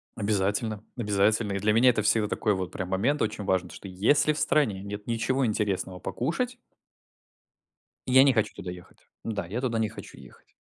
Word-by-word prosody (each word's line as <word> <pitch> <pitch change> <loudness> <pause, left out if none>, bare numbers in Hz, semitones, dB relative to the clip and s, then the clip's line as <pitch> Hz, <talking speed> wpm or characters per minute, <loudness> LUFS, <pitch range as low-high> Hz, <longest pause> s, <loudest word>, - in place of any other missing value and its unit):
Обязательно, 105 +1 -1
обязательно. 105 -1 +1
И 100 - -1
для 105 +2 +2
меня 125 +3 +6
это 110 -3 +2
всегда 105 0 +2
такой 105 0 0
вот 95 -1 -4
прям 95 -1 -5
момент 120 +11 +1
очень 105 -1 -1
важный, 95 -2 0
то - - -11
что 100 - -10
если 145 +12 +2
в 150 - -5
стране 105 -11 +1
нет 105 +1 -7
ничего 125 +3 0
интересного 100 -4 -2
покушать 240 - -2 1.5
я 130 +1 +6
не 135 - +4
хочу 110 -3 0
туда 90 - -7
ехать. 90 0 -11 0.2
Да, 105 -6 -3
я 110 +7 -3
туда 120 -4 -1
не 110 - 0
хочу 110 - -11
ехать! - - -16
105 Hz, 185 wpm, -27 LUFS, 100-120 Hz, 1.5 s, меня